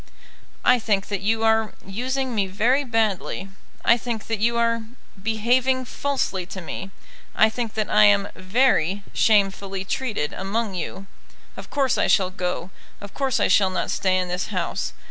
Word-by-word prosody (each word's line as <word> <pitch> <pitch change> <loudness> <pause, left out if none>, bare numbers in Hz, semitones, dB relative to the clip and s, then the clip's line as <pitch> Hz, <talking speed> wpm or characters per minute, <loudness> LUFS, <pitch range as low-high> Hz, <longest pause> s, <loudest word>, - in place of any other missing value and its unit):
"I 250 0 +5
think 205 -3 0
that 200 -2 -2
you 220 +2 0
are 220 -1 +2
using 255 +6 -2
me 205 -3 +1
very 230 +9 +2
badly. 220 -5 -1 0.4
I 235 - +6
think 230 -2 -4
that 225 -2 -2
you 235 +2 +2
are 230 0 +2 0.4
behaving 245 +5 +1
falsely 250 -10 -2
to 190 - -7
me. 190 +2 -6 0.5
I 220 0 +5
think 230 -1 -4
that 215 -1 0
I 210 0 +5
am 200 -1 +4
very 195 -2 +2
shamefully 195 -2 +2
treated 210 - -2
among 205 +2 -2
you. 185 +2 -5 0.5
Of - - -10
course 275 -3 +1
I - - +3
shall 185 -2 +3
go. 180 -1 -3 0.3
Of 200 -1 -10
course 270 -3 0
I - - +3
shall 195 -2 +4
not 185 - -2
stay 185 -1 +1
in 185 -1 -1
this 180 +1 -2
house. - - -3
215 Hz, 165 wpm, -23 LUFS, 195-235 Hz, 0.5 s, I